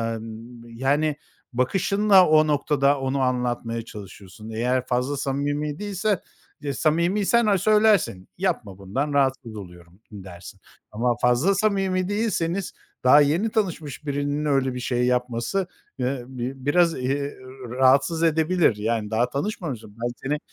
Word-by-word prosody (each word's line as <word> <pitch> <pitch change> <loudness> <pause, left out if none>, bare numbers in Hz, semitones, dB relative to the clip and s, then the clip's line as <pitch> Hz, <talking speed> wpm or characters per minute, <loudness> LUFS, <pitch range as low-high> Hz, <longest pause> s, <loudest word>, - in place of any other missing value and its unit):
Imm, 115 +2 -10
yani 140 +6 0 0.4
bakışınla 195 - +3
o 155 0 +5
noktada, 145 -1 +2
onu 135 +1 -1
anlatmaya 120 -2 -1
çalışıyorsun. 105 -1 -11
Eğer 125 +3 0
fazla 125 +3 -1
samimi 145 +2 -2
değilse; 205 -1 -1 0.5
samimiysen 185 - +2
ha, 205 -2 +3
söylersin. 210 - +2
Yapma, 160 - -2
bundan 130 +10 -3
rahatsız 130 -4 0
oluyorum, 90 -2 -12
dersin 95 -1 -11 0.3
ama 120 +3 0
fazla 125 +11 +3
samimi 195 -3 0
değilseniz, 200 -4 -1 0.3
daha 130 +4 +7
yeni 160 +10 +2
tanışmış 165 - -3
birinin 145 +1 -2
öyle 135 -3 +1
bir 125 - -5
şey 125 0 0
yapması, 125 +9 -1 0.3
ııı, 125 0 -1
bi 130 +1 -6
biraz, 170 +3 +3
eee, 140 +3 -2 0.3
rahatsız 135 +6 +3
edebilir. 160 - +3
Yani, 110 0 -2
daha 120 +3 +1
tanışmamışım, 140 - -4
ben 120 - 0
seni 145 +2 -1
140 Hz, 125 wpm, -24 LUFS, 120-170 Hz, 0.5 s, daha